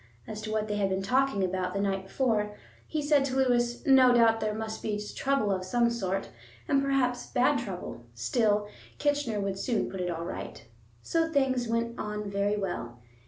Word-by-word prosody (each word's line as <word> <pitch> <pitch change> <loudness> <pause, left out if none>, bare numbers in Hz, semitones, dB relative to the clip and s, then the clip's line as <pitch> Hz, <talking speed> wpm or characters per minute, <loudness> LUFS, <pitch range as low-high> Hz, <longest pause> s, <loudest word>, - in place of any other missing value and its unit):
As 215 0 -6
to 215 0 -5
what 215 0 0
they 210 -1 -2
had 200 -1 +1
been 190 0 -1
talking 255 -1 +2
about 185 0 -1
the - - 0
night 195 -1 -1
before, 210 -3 0 0.3
he 305 -2 -2
said 290 -1 +4
to 260 -1 -2
Lewis, 240 -2 +1
no 265 -2 +7
doubt 225 -1 +5
there 215 -1 -1
must 220 0 -4
be 210 -1 -2 0.2
trouble 275 -7 +1
of 185 -1 -1
some 235 +5 +2
sort, 195 -4 -2 0.4
and 275 - +3
perhaps 260 -3 0
bad 255 +3 +2
trouble; 190 - -6
still, 210 - +1 0.3
Kitchener 290 -7 0
would 195 -1 -2
soon 230 -1 -1
put 190 - -4
it 180 - -1
all 170 -1 -3
right. - - -7 0.4
So 330 -1 0
things 260 -4 +1
went 230 +1 -1
on 210 -1 -4
very 200 +1 +1
well. 175 -12 -4
220 Hz, 190 wpm, -29 LUFS, 195-255 Hz, 0.4 s, no